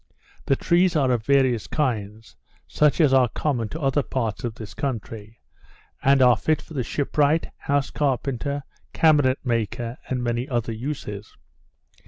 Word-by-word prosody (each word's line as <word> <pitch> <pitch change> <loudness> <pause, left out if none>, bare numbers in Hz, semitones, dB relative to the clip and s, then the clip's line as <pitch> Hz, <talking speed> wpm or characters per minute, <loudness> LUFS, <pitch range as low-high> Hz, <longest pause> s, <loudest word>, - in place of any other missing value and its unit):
The 135 - +2
trees 175 +4 +2
are 135 -4 +2
of 115 -3 -1
various 130 -5 +2
kinds, 110 -7 -3 0.3
such 150 +1 +2
as 150 -5 +4
are 130 -2 +4
common 120 -7 -2
to 160 - -6
other 140 -1 +1
parts 120 -4 -3
of 120 -3 -3
this 110 -2 -9
country, 115 -5 -5 0.6
and 135 -1 +4
are 125 -1 +6
fit 155 +7 0
for - - -13
the 130 -4 -1
shipwright, 145 +5 0
house 140 -1 -1
carpenter, 140 0 -1 0.3
cabinet 145 -5 +4
maker, 115 0 -2
and 125 -1 -1
many 120 +3 -2
other 120 -3 -1
uses. 110 -4 -6
130 Hz, 150 wpm, -24 LUFS, 115-145 Hz, 0.6 s, are